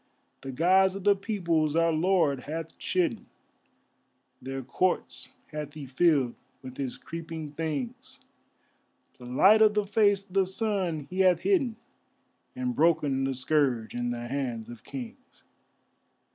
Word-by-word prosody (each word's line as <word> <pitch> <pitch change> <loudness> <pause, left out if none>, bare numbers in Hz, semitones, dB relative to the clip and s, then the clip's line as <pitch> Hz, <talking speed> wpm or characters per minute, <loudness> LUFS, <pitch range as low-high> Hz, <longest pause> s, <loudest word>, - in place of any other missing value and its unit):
The 135 - -6
Gods 185 +7 +3
of 195 - -6
the 205 0 +5
Peoples 170 -7 0
our 165 0 +3
Lord 160 -5 +1
hath 160 +2 -5
chidden, 180 -2 -1 1.1
Their 135 +1 -5
courts 180 +8 -1 0.2
hath 150 -1 -6
He 150 -3 -7
filled 135 -2 +2 0.3
with 130 -1 -9
His 135 -3 -4
creeping 160 -2 -7
things; 150 -5 -5 1.0
The 125 - -11
light 195 - +5
of 215 -1 +5
the 210 -1 +1
face 205 -1 +2
of 185 - -19
the 195 -1 +3
Sun 190 -5 -1
he 185 - -4
hath 185 -3 +4
hidden, 280 - +1 0.8
And 255 -1 -2
broken 150 -6 +2
the 135 0 -1
scourge 125 -4 0
in 120 0 -2
the 120 0 -4
hands 120 -4 -3
of 120 -2 -11
kings. 255 0 -10
165 Hz, 140 wpm, -28 LUFS, 135-190 Hz, 1.1 s, the